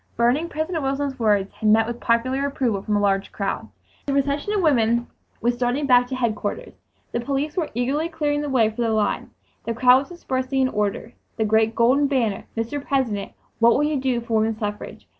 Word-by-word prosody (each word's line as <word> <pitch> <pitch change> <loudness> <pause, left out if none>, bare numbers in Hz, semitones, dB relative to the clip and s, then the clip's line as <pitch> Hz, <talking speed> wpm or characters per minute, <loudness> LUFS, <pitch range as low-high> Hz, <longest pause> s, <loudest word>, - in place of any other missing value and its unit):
Burning 250 +8 +2
President 315 +2 -2
Wilson's 270 0 -2
words 205 -3 +1
had 215 -1 0
met 220 +1 +5
with 235 +1 -5
popular 255 +4 +1
approval 245 -8 -1
from 210 +1 -1
a - - +2
large 195 -1 0
crowd! 200 -1 -3 0.4
The 280 - 0
procession 280 +6 0
of 420 - +1
women 235 -5 +3 0.4
was 240 +2 +2
starting 245 +4 -1
back 250 -2 +5
to 260 - -4
headquarters, 220 -5 -2 0.4
the 235 - -1
police 280 +4 -2
were 335 -4 -1
eagerly 275 +7 0
clearing 295 -3 -1
the 295 - -3
way 245 -5 +3
for 220 - -5
the 230 - +1
line; 215 -2 0 0.3
the 230 - -3
crowd 250 +2 +6
was 275 - -7
dispersing 265 -6 -2
in 260 - +2
order; 210 +1 -2 0.2
the 220 - +1
great 220 +1 +2
golden 260 +5 +3
banner, 235 -8 -1
"Mr. 255 +6 -3
President, 235 -9 -1 0.3
what 235 0 +6
will 290 - +2
you 300 -2 0
do 255 -2 0
for 230 0 -6
woman 220 0 0
suffrage?" 210 -1 -6
245 Hz, 200 wpm, -23 LUFS, 225-280 Hz, 0.4 s, crowd